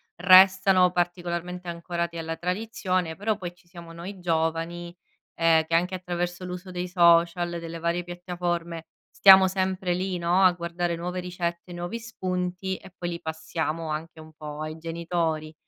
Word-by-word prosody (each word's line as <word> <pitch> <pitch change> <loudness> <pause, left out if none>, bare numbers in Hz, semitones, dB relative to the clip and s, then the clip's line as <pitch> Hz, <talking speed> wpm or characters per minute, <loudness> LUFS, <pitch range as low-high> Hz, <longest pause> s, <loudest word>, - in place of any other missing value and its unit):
restano 185 0 +6
particolarmente 175 0 -3
ancorati 170 0 -3
alla 165 0 -4
tradizione, 185 -3 -2
però 210 +3 -1
poi 175 -3 -6
ci 175 0 -27
siamo 170 -1 -11
noi 180 +4 -8
giovani, 170 +1 -2 0.4
ehm, 165 -1 +4
che 165 - 0
anche 180 +2 +1
attraverso 175 0 -4
l'uso 180 +1 -7
dei 180 0 -3
social, 170 -1 +4
delle 165 0 -7
varie 170 +1 -1
piattaforme, 175 -1 -4 0.2
stiamo 190 -1 +8
sempre 185 -1 -1
lì, 185 +1 -2
no, 175 +2 +2
a 185 - +7
guardare 170 0 -2
nuove 180 +2 -4
ricette, 175 -1 -4
nuovi 175 +6 -5
spunti 185 -3 -3
e 190 - -15
poi 175 -1 -3
li 170 0 -5
passiamo 160 0 -3
anche 160 +1 -5
un 155 - -14
po' 150 0 -8
ai 155 +1 -5
genitori, 165 -1 -2
175 Hz, 155 wpm, -26 LUFS, 170-180 Hz, 0.4 s, stiamo